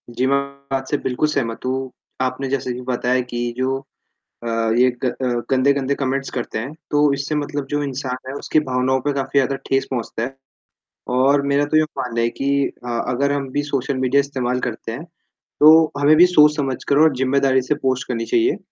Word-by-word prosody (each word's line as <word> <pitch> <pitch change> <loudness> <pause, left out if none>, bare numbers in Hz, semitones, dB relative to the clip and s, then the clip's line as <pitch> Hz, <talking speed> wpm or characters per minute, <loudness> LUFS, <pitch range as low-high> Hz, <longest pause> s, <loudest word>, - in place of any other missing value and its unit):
जी, 120 +2 -1
मैं 140 +1 +3 0.3
बात 135 0 -2
से 145 - +1
बिल्कुल 130 +4 -1
सहमत 115 -6 -2
हूँ। 130 0 -2 0.3
आपने 130 +1 -1
जैसे 135 -1 -2
अभी 125 +1 -5
बताया 125 +1 +1
कि 120 0 -2
जो 130 +1 0 0.7
अ, - - -6 0.3
ये 125 +1 +5
ग - - +2
अ, 130 +1 -2 0.2
गंदे-गंदे 135 +1 +2
कमेंट्स 135 0 -2
करते 120 -3 -4
हैं, 125 +6 -5 0.2
तो 145 -1 +3
इससे 140 +2 -3
मतलब 145 -1 -3
जो 145 0 0
इंसान 135 -2 -3
है, - - -4
उसकी 155 - +1
भावनाओं 130 -1 0
पे 145 +3 -1
काफ़ी 135 0 0
ज़्यादा 135 +1 0
ठेस 135 0 +1
पहुँचता 120 -3 -3
है। 130 +3 -4 0.8
और 140 +2 +4
मेरा 140 +1 +2
तो 155 - 0
ये 155 - +6 0.2
मानना 125 -3 -2
है 115 - +2
कि 135 - 0 0.4
अ, - - -6 0.2
अगर 140 +3 +1
हम 140 -1 -2
भी 145 - 0
सोशल 140 -1 -2
मीडिया 130 +2 +2
इस्तेमाल 125 -3 -2
करते 115 -2 -4
हैं, 135 +8 -6 0.6
तो 160 +1 +7
हमें 145 +2 +5
भी 175 - +8
सोच-समझकर 150 -5 +3
और 155 -4 +4
ज़िम्मेदारी 130 0 +2
से 140 +4 -1
पोस्ट 130 -1 0
करनी 115 -2 -2
चाहिए, 355 - +2
135 Hz, 195 wpm, -20 LUFS, 125-145 Hz, 0.8 s, भी